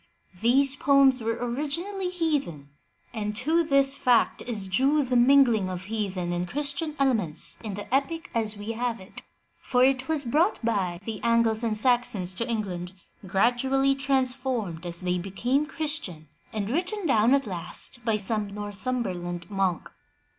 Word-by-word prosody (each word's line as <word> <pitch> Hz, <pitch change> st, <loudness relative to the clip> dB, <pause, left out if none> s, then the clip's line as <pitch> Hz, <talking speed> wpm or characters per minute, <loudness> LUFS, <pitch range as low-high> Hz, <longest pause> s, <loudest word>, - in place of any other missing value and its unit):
These 265 Hz, +4 st, +4 dB
poems 270 Hz, -2 st, +4 dB
were 225 Hz, 0 st, -1 dB
originally 320 Hz, +10 st, -3 dB
heathen, 290 Hz, -, -2 dB, 0.4 s
and 210 Hz, -2 st, -3 dB
to 315 Hz, +9 st, +1 dB
this 275 Hz, -3 st, +3 dB
fact 245 Hz, -4 st, +2 dB
is 215 Hz, -5 st, +1 dB
due 270 Hz, +10 st, +2 dB
the 255 Hz, -1 st, -2 dB
mingling 240 Hz, -5 st, +5 dB
of 180 Hz, 0 st, -5 dB
heathen 195 Hz, -4 st, -3 dB
and 175 Hz, +1 st, -2 dB
Christian 295 Hz, -, -3 dB
elements 225 Hz, -, 0 dB
in 210 Hz, -3 st, -4 dB
the 205 Hz, +3 st, -7 dB
epic 305 Hz, +5 st, -1 dB
as 220 Hz, -2 st, -1 dB
we 205 Hz, +2 st, -5 dB
have 235 Hz, 0 st, -2 dB
it, 185 Hz, +1 st, -10 dB, 0.4 s
for 250 Hz, -1 st, +2 dB
it 265 Hz, 0 st, +2 dB
was 315 Hz, -3 st, 0 dB
brought 310 Hz, -, +2 dB
by 190 Hz, -6 st, -1 dB
the 220 Hz, -3 st, -5 dB
Angles 230 Hz, -1 st, +2 dB
and 220 Hz, -2 st, 0 dB
Saxons 215 Hz, -6 st, +2 dB
to 230 Hz, +6 st, -3 dB
England, 190 Hz, -5 st, -3 dB, 0.3 s
gradually 250 Hz, +7 st, +2 dB
transformed 255 Hz, -, 0 dB
as 170 Hz, +1 st, -2 dB
they 180 Hz, 0 st, -1 dB
became 245 Hz, +11 st, -1 dB
Christian, 295 Hz, -, -3 dB, 0.2 s
and 210 Hz, 0 st, -3 dB
written 365 Hz, +6 st, -2 dB
down 240 Hz, -2 st, +4 dB
at 275 Hz, -1 st, 0 dB
last 195 Hz, +5 st, -4 dB
by 225 Hz, -2 st, +1 dB
some 210 Hz, 0 st, -1 dB
Northum 210 Hz, +5 st, -3 dB
berland 175 Hz, -1 st, -5 dB
monk. 190 Hz, -4 st, -1 dB
235 Hz, 155 wpm, -26 LUFS, 200-275 Hz, 0.4 s, mingling